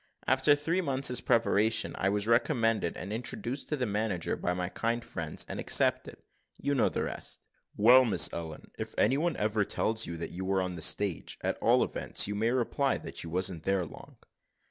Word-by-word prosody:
After 130 +3 +4
three 165 +5 -1
months' 135 -5 0
preparation 110 -2 +1
I 95 - 0
was 100 0 -1
recommended 115 - +1
and 100 +3 -6
introduced 120 +3 -4
to 150 - -1
the 125 - -1
manager 105 -5 -2
by 90 - -2
my 90 0 -2
kind 115 +4 -2
friends, 80 -2 -4
and - - -6
accepted. - - +2 0.4
You 140 +1 -1
know 135 - +2
the - - -2
rest." - - -4 0.3
"Well, 125 +5 +7
Miss 95 - +5
Ellen, 80 -2 -7
if - - -6
any 130 +6 +3
one 170 +1 -1
ever 105 0 +1
tells 110 +2 0
you 85 0 -5
that 85 - -5
you 95 - -5
were 95 0 0
on 90 0 -4
the 85 - -8
stage, 95 +2 +1
at - - -2
all - - +3
events - - 0
you 105 - -3
may 110 +3 0
reply 130 +2 0
that - - -6
you 85 - -7
wasn't 90 0 0
there 95 +1 0
long." - - -13
110 Hz, 195 wpm, -29 LUFS, 95-125 Hz, 0.4 s, Well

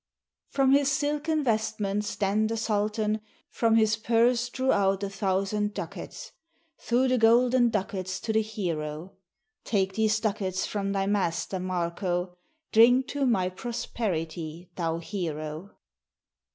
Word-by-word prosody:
From 270 -1 +2
his 280 0 +4
silken 300 +2 0
vestments 215 -3 -1
then 210 +2 +1
the 225 +1 -2
sultan 215 0 0 0.3
From 225 -1 +2
his 220 -1 +3
purse 235 +2 +2
drew 260 +2 0
out 195 0 +2
a 200 - -3
thousand 200 +1 -1
ducats, - - -7 0.5
Threw 250 +3 +1
the 255 -1 +2
golden 240 +2 +5
ducats 190 -3 -3
to 220 - -2
the 220 - +3
hero: 175 -5 -4 0.5
"Take 195 -3 0
these 220 +1 +2
ducats 195 -4 -1
from 200 -1 -2
thy 195 -1 0
master, 190 -2 -1
Marko, 180 0 -2 0.4
Drink 245 +4 +5
to 280 -2 0
my 190 -7 +2
prosperity, 175 -6 -4
thou 165 -2 -1
hero!" 165 -1 -5
210 Hz, 125 wpm, -27 LUFS, 185-230 Hz, 0.5 s, golden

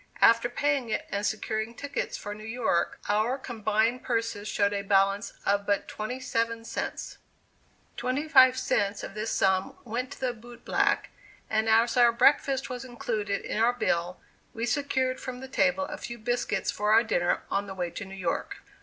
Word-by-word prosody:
After 230 +1 +5
paying 275 -1 0
it - - -1
and 200 +1 -1
securing 220 +1 -2
tickets 285 +4 -3
for 205 - -6
New 215 +1 -10
York, 225 -6 0
our 215 +5 +1
combined 225 -1 0
purses 230 -3 -2
showed 200 -1 +1
a 200 - -1
balance 195 +1 +2
of 200 0 +1
but 200 -1 +1
twenty 230 +4 -5
seven 230 -2 -1
cents. - - -5 0.8
Twenty 270 +5 -1
five 260 -4 +7
cents 200 -3 0
of - - -6
this 215 +2 -3
sum 190 -1 +1
went 240 +3 -3
to - - -14
the 255 -2 -1
boot 240 +1 -14
black, - - +1 0.4
and 220 0 +2
as 230 +2 +4
our 240 -1 +7
breakfast 270 +2 +3
was 250 -1 -5
included 220 -5 -3
in - - -2
our 235 +2 +4
bill 175 -6 -1 0.4
we 230 +1 -1
secured 260 0 0
from 250 -1 -6
the 265 - -8
table 230 +2 +2
a 300 +1 -6
few 235 - -6
biscuits 240 +2 -1
for 210 +1 0
our 225 +2 +6
dinner 175 -6 0
on 200 +1 0
the 190 - -7
way 175 -2 -3
to 205 - -6
New 195 0 -9
York. 180 -3 -2
225 Hz, 180 wpm, -28 LUFS, 205-250 Hz, 0.8 s, five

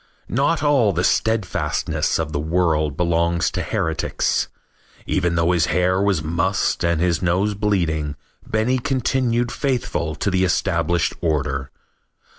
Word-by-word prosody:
Not - - +1
all 135 -9 +3
the 90 - 0
steadfastness 110 -1 0
of 80 -1 -3
the 75 - -1
world 80 -2 0
belongs 85 0 +1
to - - -2
heretics. 80 -1 -1 0.6
Even 85 0 0
though 85 +1 +2
his 85 -4 +2
hair 90 +3 +1
was 100 -6 +1
mussed 85 +6 0
and 85 -2 +1
his 85 -1 +1
nose 95 +4 +1
bleeding, 85 -8 -1 0.3
Benny 115 +4 0
continued 120 -2 0
faithful 120 - -2
to 100 - -1
the 95 0 +2
established 85 -2 +1
order. 70 -5 -1
90 Hz, 130 wpm, -21 LUFS, 80-105 Hz, 0.6 s, all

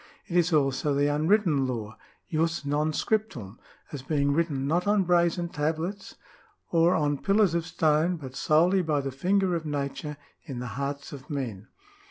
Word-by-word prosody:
It 175 - -6
is 175 0 +3
also 140 -1 +1
the 145 +1 +2
Unwritten 155 -3 +2
Law 110 -4 -4 0.3
{jus 165 -1 -1
non 150 +2 0
scriptum), 150 - -2 0.3
as 145 - -6
being 140 +1 0
written 145 -4 0
not 175 +7 0
on 205 -1 +3
brazen 175 0 +2
tablets 165 +5 -3 0.6
or 170 +2 +4
on 145 -3 0
pillars 200 -3 +3
of 170 0 -1
stone, 160 +1 +2
but 135 -4 -9
solely 175 +5 +3
by 155 -4 0
the 135 0 -4
finger 185 +7 +1
of 165 -2 -1
nature 145 0 -4 0.3
in 135 -6 -7
the 125 - -4
hearts 140 +1 -4
of 135 -2 -10
men. 120 -8 -4
155 Hz, 165 wpm, -27 LUFS, 140-175 Hz, 0.6 s, or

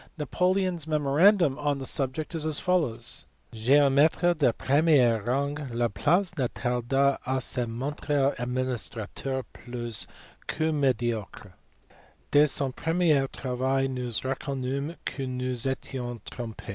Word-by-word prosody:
Napoleon 185 +4 +1
s 160 -2 -7
memorandum 155 +1 +3
on 145 -1 0
the 135 - -5
subject 135 +5 0
is 160 -2 -2
as 155 -2 +1
follows. 170 -11 0 0.3
"Geometre 140 +8 +4
de 150 -7 +2
premier 135 -4 +3
rang, 140 +6 0 0.2
Laplace 150 - +1
ne 125 - +2
tarda 130 +3 0
pas - - -16
a 130 0 +1
se 125 -1 -1
montrer 140 +3 -1
administrateur 125 +1 -3
plus 120 -3 -4 0.4
que 160 0 0
mediocre; 120 -9 -1 0.8
des 145 +1 +6
son 135 -2 0
premier 160 -2 +2
travail 130 +1 -1
nous 125 -2 -3
reconnumes 135 +3 -3
que 135 -2 -4
nous 125 0 -3
nous 125 +1 -1
etions 125 -2 -4
trompe. 115 -3 -7
135 Hz, 125 wpm, -27 LUFS, 125-150 Hz, 0.8 s, des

